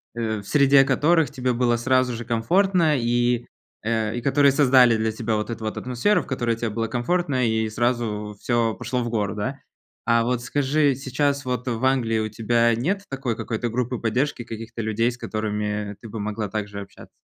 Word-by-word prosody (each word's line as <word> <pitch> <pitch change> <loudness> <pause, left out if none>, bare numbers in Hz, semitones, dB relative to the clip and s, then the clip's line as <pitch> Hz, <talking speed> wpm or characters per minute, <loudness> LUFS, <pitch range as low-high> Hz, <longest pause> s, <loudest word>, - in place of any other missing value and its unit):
Э, 110 -2 -2
в 100 - -12
среде 140 -2 +5
которых 160 +1 +3
тебе 125 0 -1
было 120 0 +2
сразу 130 +1 +2
же 120 0 -6
комфортно 165 - +2
и, 120 0 +1 0.4
э, 110 0 -1
и - - -3
которые 140 +1 +4
создали 130 -4 +5
для 110 0 0
тебя 110 0 -2
вот 105 +2 -2
эту 115 -1 -6
вот 110 - -3
атмосферу, 125 - +1
в - - -14
которой 120 -3 -1
тебе 115 -1 -3
было 115 +1 -2
комфортно. 130 +1 0
И 110 0 0
сразу 110 -2 -1
всё 115 -2 +1
пошло 125 +1 -3
в 120 - -3
гору, 105 -3 -1
да. 130 +7 -3 0.5
А 115 -1 +4
вот 125 0 -1
скажи, 145 +2 +1
сейчас 140 +2 -1
вот 125 0 -3
в 120 +1 -1
Англии 125 -4 +2
у 110 - -1
тебя 115 +2 +2
нет 180 - -1
такой 135 -4 -3
какой-то 120 +1 -3
группы 125 +1 -2
поддержки, 125 +2 -1
каких-то 115 0 -7
людей, 115 +2 0
с 120 - -10
которыми 105 -1 -3
ты 115 - -9
бы 110 +1 -6
могла 105 0 -3
также 105 -2 -4
общаться? 100 - -13
120 Hz, 190 wpm, -23 LUFS, 110-130 Hz, 0.5 s, среде